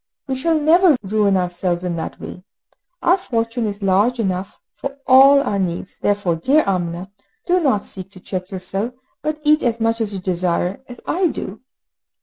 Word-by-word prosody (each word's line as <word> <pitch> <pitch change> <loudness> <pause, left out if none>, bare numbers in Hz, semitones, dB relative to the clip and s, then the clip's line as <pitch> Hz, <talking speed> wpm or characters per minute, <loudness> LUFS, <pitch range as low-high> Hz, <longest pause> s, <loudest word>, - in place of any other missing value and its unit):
We 265 - -1
shall 310 +5 +1
never 325 0 +5
ruin 200 -1 +2
ourselves 175 0 -1
in 180 -2 -2
that 160 - -5
way! 180 - -9 0.6
Our 365 +3 +4
fortune 230 - -2
is 205 0 -5
large 205 +6 +2
enough 190 -3 -2
for 275 0 -6
all 275 +2 +7
our 205 -7 -1
needs, 180 0 -3
therefore, 200 -5 0
dear 280 - +3
Amina, 180 0 -2 0.3
do 360 +1 +3
not 265 - +1
seek 190 0 -8
to 185 - -12
check 185 0 -5
yourself, 195 +5 -4 0.3
but 305 0 -2
eat 305 0 +4
as 235 -2 0
much 225 0 0
as 215 -2 -1
you 195 - -4
desire, 180 +1 -1
as 245 -2 -11
I 360 +1 +1
do!" 215 - -6
205 Hz, 175 wpm, -20 LUFS, 185-270 Hz, 0.6 s, all